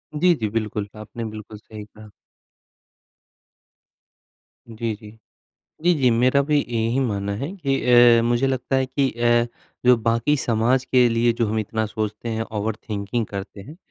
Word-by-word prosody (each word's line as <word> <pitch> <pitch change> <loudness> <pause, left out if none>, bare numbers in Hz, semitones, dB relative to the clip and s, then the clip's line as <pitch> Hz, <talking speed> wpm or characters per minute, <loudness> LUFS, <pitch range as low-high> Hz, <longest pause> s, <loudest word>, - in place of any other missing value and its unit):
जी, 175 +4 +4
जी, 110 -7 -3
बिल्कुल। 105 -1 -3
आपने 110 +2 -7
बिल्कुल 110 -1 -8
सही 105 0 -11
कहा। 105 0 -15 2.6
जी, 115 0 -4
जी। 105 +1 -13 0.7
जी, 175 +1 +4
जी, 130 -4 +3
मेरा 125 +4 +3
भी 150 +1 +1
यही 115 -1 -1
मानना 100 -6 -1
है 140 - -4
कि 140 -7 -1 0.4
अ, - - +1
मुझे 120 +3 +1
लगता 135 0 -1
है 130 0 +2
कि 135 +1 0
अ, 120 0 +2 0.4
जो 125 0 +7
बाकी 115 +5 +1
समाज 120 +1 +1
के 125 -1 +4
लिए 115 +1 +2
जो 115 -1 -1
हम 110 +1 -1
इतना 110 +1 -2
सोचते 110 +2 -4
हैं, 110 0 -2
ओवरथिंकिंग 110 0 -3
करते 100 0 -8
हैं 150 - -12
115 Hz, 155 wpm, -22 LUFS, 110-130 Hz, 2.6 s, जो